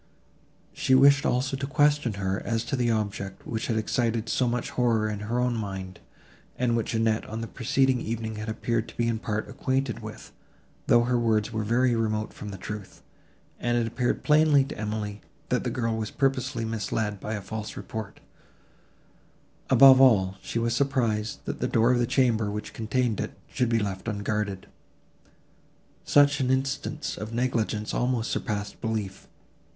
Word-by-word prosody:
She 130 - +2
wished 140 +2 +6
also 130 +2 0
to 135 0 -4
question 145 -4 +2
her, 100 0 -2
as 115 0 -1
to 130 - -1
the 120 -2 +1
object, 100 -3 -3
which 110 -2 -3
had 115 - 0
excited 115 0 0
so 125 - +1
much 120 0 -2
horror 115 -3 +2
in 105 -1 -3
her 115 +4 -2
own 125 -1 +1
mind, 95 -4 -5 0.6
and 120 -2 +1
which 115 0 -1
Annette 110 0 +1
on 110 +1 -4
the 115 - -4
preceding 130 +2 +1
evening 110 -1 -4
had 110 +1 -5
appeared 115 +1 -1
to - - -15
be 120 - +1
in 115 -1 0
part 110 -1 -3
acquainted 130 -2 -1
with, - - -9 0.6
though 120 - +5
her 120 0 +1
words 110 -1 +1
were 110 0 -1
very 120 +3 +2
remote 110 -1 -1
from 105 - -8
the 100 - -7
truth, 105 +1 -8 0.6
and 120 0 0
it 120 - +1
appeared 120 +2 -1
plainly 150 -2 +5
to - - -7
Emily, 105 -1 -4 0.3
that - - +1
the - - -1
girl 115 -2 -1
had 110 - -2
been - - -20
purposely 135 -3 0
misled 110 -2 -2
by 110 +3 -4
a - - -3
false 110 +2 -6
report: 110 -3 -6 1.5
above 130 +1 +8
all 95 -8 +5
she - - -4
was 115 0 +1
surprised, 120 -6 0
that - - -4
the - - 0
door 115 +2 +3
of 125 - +2
the 120 - +1
chamber, 115 -6 +2
which 105 +1 -5
contained 115 0 -1
it, - - -4
should 125 -2 -1
be 115 - +2
left 100 -2 -3
unguarded. 105 -2 -2 1.4
Such 145 0 +4
an 130 -2 0
instance 135 +3 -1
of 105 +1 -6
negligence 115 -3 -1
almost 125 -2 0
surpassed 105 -2 -3
belief. 110 -4 -3
115 Hz, 175 wpm, -27 LUFS, 105-125 Hz, 1.5 s, above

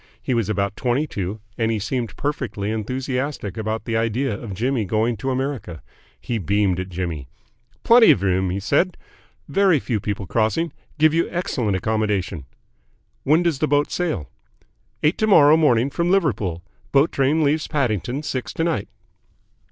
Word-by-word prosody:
He - - -2
was 115 -4 0
about 100 -1 -1
twenty 130 +4 0
two, 100 - -5 0.2
and 115 -1 +1
he 110 - 0
seemed 115 +3 -3
perfectly 110 -8 -3
enthusiastic 125 0 -3
about 110 0 -3
the 115 - -2
idea 115 +3 0
of 100 -1 -6
Jimmy 125 +3 0
going 110 +4 0
to 135 +7 -3
America. 130 - -3 0.4
He 115 -2 -3
beamed 100 -1 +1
at 95 0 -4
Jimmy. 85 -6 -4 0.6
"Plenty 235 0 +7
of 100 - +4
room," 95 -1 +1
he 95 +2 -2
said. 160 - +1 0.5
"Very 195 -5 +3
few 115 -4 -2
people 100 0 -4
crossing. 110 - 0 0.2
Give 155 0 +4
you 165 +1 +1
excellent 125 - -1
accommodation." 105 -7 -1 0.8
"When 155 +5 +4
does 165 -6 0
the 155 - +1
boat 145 0 +1
sail?" 160 - -2 0.8
"Eight 150 +4 +2
to 215 - +2
morrow 155 -7 +7
morning 140 -5 +3
from 170 +3 0
Liverpool. 110 - 0 0.3
Boat 140 +3 +4
train 145 +4 +2
leaves 150 +2 +1
Paddington 130 - -1
six 130 -3 -4
to 165 - -1
night." 165 -12 -1
120 Hz, 160 wpm, -22 LUFS, 100-150 Hz, 0.8 s, Plenty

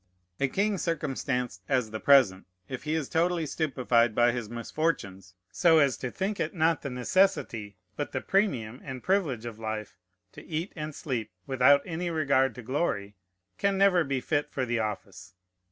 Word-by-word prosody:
A 140 - +2
king 200 +6 0
circumstanced 135 - -2
as 125 -5 +1
the 110 - -4
present, 125 -10 +4 0.2
if 130 +2 -6
he 155 +1 0
is 155 -4 -1
totally 170 0 +1
stupefied 125 -7 +1
by 120 0 +4
his 120 -3 -4
misfortunes, 115 - -3 0.2
so 165 -2 +4
as 140 -4 +4
to 125 - -4
think 195 +8 -3
it - - -2
not 165 -1 +2
the 140 - -4
necessity, 125 - 0 0.2
but 145 - -4
the - - -2
premium 130 - 0
and 130 -2 -7
privilege 160 - 0
of 115 -2 -7
life, 110 -3 -5 0.3
to - - -12
eat 165 +3 -4
and 155 -2 -5
sleep, 120 -7 -3 0.2
without 135 +2 +4
any 175 +1 -3
regard 135 -6 +2
to 125 - -9
glory, 110 -6 -1 0.5
can 200 -1 +1
never 190 -3 +4
be 135 -3 -1
fit 150 +1 -1
for 130 - -2
the 120 -1 -1
office. 100 -3 -5
135 Hz, 170 wpm, -28 LUFS, 115-160 Hz, 0.5 s, present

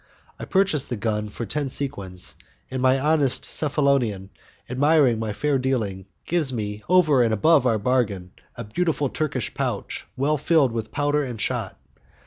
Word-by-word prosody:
I - - -5
purchase 190 -8 +1
the 125 - -4
gun 105 -1 -2
for 110 - -6
the - - -8
ten 145 -2 -1
sequins, 100 -11 -3 0.4
and 130 -1 -3
my 130 +1 +3
honest 145 -2 +2
Cephalonian, 135 -10 +1 0.4
admiring 135 -2 +3
my 110 -1 -2
fair 140 +5 0
dealing, 110 -8 -2 0.2
gives 160 -5 +1
me, 105 -3 -4
over 160 -8 +5
and 115 -2 +2
above 140 +5 +4
our 115 -3 +2
bargain, 105 -6 -1 0.2
a 120 - -6
beautiful 145 +5 -1
Turkish 140 -6 -2
pouch - - -4
well 145 +3 +1
filled 150 -4 +3
with 110 -1 -4
powder 145 +1 +1
and 125 -5 -5
shot. - - -2
130 Hz, 160 wpm, -23 LUFS, 110-145 Hz, 0.4 s, over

